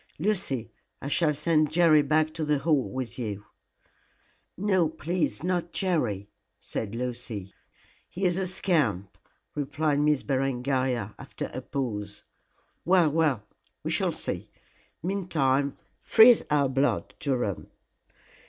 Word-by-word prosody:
Lucy, 150 - -1 0.3
I 140 - -5
shall 160 0 +3
send 155 0 +2
Jerry 160 -1 +5
back 155 +2 +1
to 160 - -3
the 150 -1 +2
Hall 140 -6 +1
with 125 +1 -5
you." 105 -3 -4 1.1
"No, 185 -4 +2
please 160 -1 -2
not, 175 -1 -1
Jerry," 125 - 0 0.3
said 110 0 -5
Lucy. 115 -5 -5 0.6
"He 190 +2 -3
is 175 -1 +3
a 190 0 -1
scamp," 145 - 0 0.4
replied 150 0 0
Miss 150 -1 +2
Berengaria, 130 -4 -1
after - - -6
a - - -4
pause. 105 -6 -4 0.6
"Well 175 -4 +4
well, 150 -8 +1 0.4
we - - -2
shall - - +1
see. - - -4 0.5
Meantime, 145 -8 0 0.2
freeze 230 +1 +7
our 145 -2 +3
blood, 135 +2 0
Durham." 125 - -2
145 Hz, 120 wpm, -27 LUFS, 125-170 Hz, 1.1 s, freeze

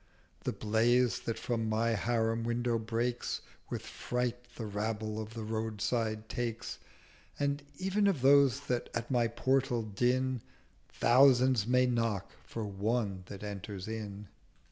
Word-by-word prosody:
The - - +1
Blaze 115 +2 +2
that 115 - -1
from 115 -2 -1
my 110 +2 +2
Harim 115 +2 +1
window 120 0 0
breaks 115 +2 -1 0.3
With - - -4
fright 125 0 -3
the 115 - -5
Rabble 110 +1 -2
of 110 +1 -8
the 115 - -4
Roadside 110 0 -1
takes; 115 -2 -3 0.6
And 140 0 0 0.2
ev'n 195 +2 +2
of 180 -10 +1
those 140 -1 +6
that 125 -3 -2
at 115 +2 -3
my 120 -2 +3
Portal 120 0 +1
din, 125 +4 +1 0.5
Thousands 125 -2 +5
may 125 +1 +4
knock 115 -6 0
for 115 -2 -5
one 100 0 -1
that 100 0 -8
enters 100 -1 -6
in.' 105 -2 -5
115 Hz, 135 wpm, -32 LUFS, 110-125 Hz, 0.6 s, those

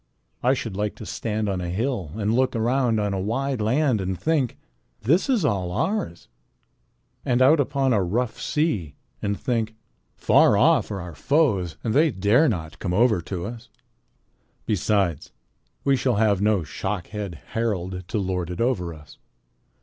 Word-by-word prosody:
I 130 +2 +3
should 115 -5 -5
like 105 +1 -2
to - - -9
stand 110 -1 -2
on 95 -2 -1
a 90 - -3
hill 105 - -2
and 110 0 0
look 130 +1 +2
around 120 0 +1
on 105 -1 0
a 95 - -1
wide 125 +4 -1
land 125 0 +2
and 95 -1 -3
think, 150 - 0 0.4
'This 165 - +2
is 235 - +2
all 95 -8 0
ours,' 90 - -2 1.0
and 125 -1 +1
out 140 +5 +6
upon 135 -1 +1
a 105 - +3
rough 110 +7 -1
sea 110 - -1 0.3
and 100 -1 -2
think, 115 -4 -1 0.4
'Far - - +4
off - - +4
there 100 - -4
are - - -5
our - - -10
foes 100 - +1
and 110 - -1
they 155 +5 +4
dare 115 - +3
not 80 -5 -4
come 90 -2 -2
over 110 -3 +3
to 85 0 -5
us.' 115 +1 -8 1.0
Besides, 100 -5 0 0.5
we 140 -1 +3
shall 125 -2 +1
have 100 -2 +2
no 105 -4 +2
Shockhead 95 +4 -4 0.2
Harald 95 -5 -2
to 110 - -2
lord 90 -3 -2
it 90 - -6
over 90 -9 0
us. 75 -1 -16
105 Hz, 165 wpm, -24 LUFS, 95-125 Hz, 1.0 s, out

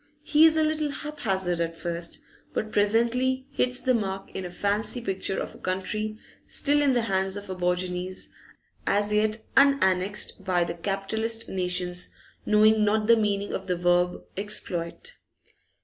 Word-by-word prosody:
He 310 +1 +6
is 320 0 +2
a 315 - +4
little 310 -1 0
haphazard 195 - -2
at 165 0 -2
first, 170 +1 -4 0.3
but 215 - -2
presently 235 +5 +2
hits 250 -2 0
the 255 - +2
mark 195 -4 -2
in 190 - -5
a - - -5
fancy 205 +6 -1
picture 195 -3 -2
of - - -5
a - - -14
country 215 +4 -3 0.3
still 290 0 +3
in 280 -2 +3
the 240 -2 +2
hands 190 -2 0
of 205 -1 -7
aborigines, 180 0 -2 0.6
as 205 +1 +1
yet 215 +1 +1
unannexed 205 -8 +3
by 180 -2 +2
the 170 - -3
capitalist 210 +6 -2
nations, 180 -1 -1 0.4
knowing 215 0 +5
not 210 +1 +2
the 230 +1 +6
meaning 205 -2 0
of - - -4
the 180 -1 0
verb 175 0 +2
'exploit. 200 - -4
205 Hz, 150 wpm, -26 LUFS, 185-230 Hz, 0.6 s, He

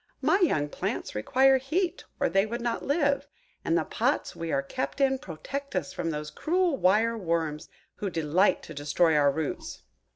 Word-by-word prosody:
My 385 - +3
young 155 - +2
plants - - -4
require 265 - +4
heat, 340 +7 -1
or - - +2
they 195 +4 +2
would 235 +2 -4
not 235 -1 -2
live; 285 -1 +1 0.4
and - - +2
the - - +1
pots - - -1
we 165 -1 -4
are 140 - +1
kept 140 - -4
in 265 -1 +3
protect 275 - -6
us 185 0 -2
from 165 - -2
those 150 -1 -4
cruel 350 - +1
wire 225 +1 +3
worms 165 -4 -2 0.3
who 200 - -2
delight 165 +4 +2
to 155 - -9
destroy 150 +3 +2
our 145 -1 +4
roots." 150 0 -4
190 Hz, 175 wpm, -28 LUFS, -, 0.4 s, require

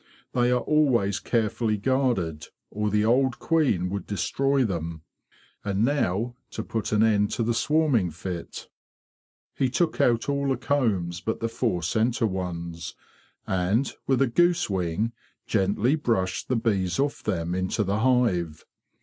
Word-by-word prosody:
They 120 -1 +2
are 125 0 +2
always 120 -10 +2
care 115 -3 +1
fully 110 -1 -1
guarded, 110 - 0 0.2
or 105 +1 -1
the 105 +1 +2
old 130 +2 +2
queen 135 - +1
would 100 -1 -4
destroy 135 +8 +1
them. 85 -5 -4 0.6
And 100 +2 +1
now 120 -4 0 0.2
to - - -5
put 110 -1 -3
an 105 0 +3
end 105 -2 +3
to 115 - 0
the 120 +1 +1
swarming 140 - +2
fit.'' 85 +1 -6 0.9
He 130 - 0
took 160 +5 0
out 115 -1 +2
all 140 0 0
the 130 - +1
combs 100 -11 0
but 110 - -2
the 115 - -1
four 115 -7 -1
centre 115 +7 +1
ones; 85 -4 -4 0.5
and, 95 +8 0
with 135 0 +3
a - - +2
goose 175 +1 +2
wing, 95 +4 -1 0.3
gently 105 +5 +1
brushed 105 -11 -1
the 130 - +1
bees 100 -6 0
off 140 +1 -1
them 85 -4 -2
into 95 +4 0
the 100 +2 -1
hive. 105 -11 +1
110 Hz, 150 wpm, -26 LUFS, 95-125 Hz, 0.9 s, an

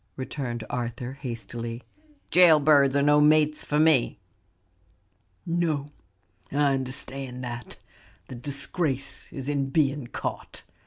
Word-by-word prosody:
returned 130 -3 -4
Arthur, 120 +1 -4
hastily; 120 -2 -6 0.5
"jail 175 -4 +7
birds 140 -2 +4
are 140 - +3
no 150 +1 +5
mates 150 0 +4
for 150 - -1
me." 155 -8 +3 1.3
"No, 160 -4 -1 0.6
I 140 0 +2
understand 130 -1 -4
that, 120 -1 -7 0.5
the - - -9
disgrace 140 +2 -3
is 135 -1 -6
in 140 -2 -1
being 140 -3 +1
caught. - - -6
140 Hz, 110 wpm, -26 LUFS, 125-150 Hz, 1.3 s, jail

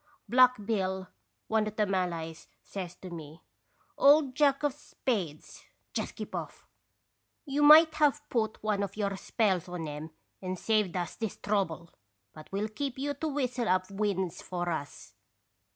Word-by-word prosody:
" - - -44
Black 250 -4 +5
Bill, 190 -3 -1 0.4
one 220 -1 +2
of 215 - -5
the 215 - +2
Malays, 170 -4 -2 0.2
says 180 -3 -6
to 185 - -10
me: 160 -1 -9 0.3
' - - -39
Old 290 -3 +5
Jack 280 +1 +3
of 290 -2 +2
Spades, 200 - -4 0.3
just - - -3
keep - - -7
off! - - -6 0.8
You 285 0 -1
might 310 +2 +9
have 295 -1 +2
put 220 -3 -1
one 210 -2 +1
of 200 0 -4
your 200 -2 -1
spells 190 -3 0
on 175 -3 -4
'em 150 +2 -6 0.3
and 185 -1 -3
saved 210 -3 +1
us 175 -2 -3
this 220 -4 -4
trouble. 180 -5 -1 0.4
But 155 -1 -13
we 195 +1 -1
'11 215 0 -3
keep 275 -3 -3
you 285 +2 -1
to 300 +3 -3
whistle 255 -5 -1
up 185 +1 +1
winds 190 -3 -1
for 175 -1 -3
us.' 145 -3 -6
205 Hz, 170 wpm, -30 LUFS, 180-255 Hz, 0.8 s, might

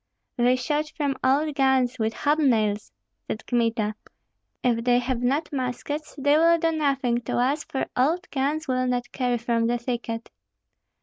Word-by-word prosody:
"They 245 +1 +3
shot 295 +4 -1
from 285 -3 0
old 290 +4 +2
guns, 265 -2 +2
with 220 0 0
hob 295 +2 +1
nails!" 215 -7 +1 0.4
said 220 - -5
Kmita; 230 -3 0 0.7
"if 235 -2 +1
they 245 0 +4
have 245 0 -1
not 280 +6 0
muskets, 275 +3 -4
they 285 +2 +3
will 335 +1 +5
do 330 0 +1
nothing 275 -6 0
to - - -3
us, 270 +5 +1
for 265 - -2
old 325 +8 +1
guns 295 +3 -1
will 255 -1 0
not 245 -1 -2
carry 250 -2 0
from 230 0 0
the 240 +1 +1
thicket." 235 -1 -4
255 Hz, 165 wpm, -25 LUFS, 240-290 Hz, 0.7 s, will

